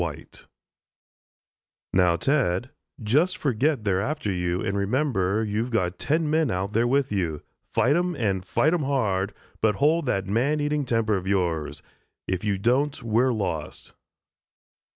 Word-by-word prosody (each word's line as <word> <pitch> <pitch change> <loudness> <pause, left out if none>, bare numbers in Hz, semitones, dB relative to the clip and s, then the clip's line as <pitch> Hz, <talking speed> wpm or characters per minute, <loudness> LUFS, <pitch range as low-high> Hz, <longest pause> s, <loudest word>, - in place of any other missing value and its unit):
WHITE 80 -4 -6 1.5
"Now, 90 -2 +4
Ted, 125 - 0 0.3
just 150 - +2
forget 135 -1 0
they're 95 -2 +1
after 140 -3 -2
you 90 -1 -1
and 100 - -2
remember 105 -2 0
you've 110 +3 -2
got 90 -6 -1
ten 155 +2 0
men 155 -2 +2
out 95 +1 -2
there 115 +2 +2
with 135 0 +1
you. 85 -7 -2 0.3
Fight 140 +4 +3
'em 175 0 0
and 100 -8 -1
fight 150 - +1
'em 175 - +1
hard, 105 -8 0 0.3
but 110 -2 +3
hold 150 +3 +2
that 95 -5 0
man 125 +10 +1
eating 145 -1 0
temper 115 -3 +1
of 95 0 -6
yours. 80 -7 -1 0.4
If 95 -1 -2
you 100 -2 0
don't, 130 +8 0
we're 115 +3 +2
lost." 90 -9 -4
110 Hz, 150 wpm, -25 LUFS, 95-140 Hz, 1.5 s, Now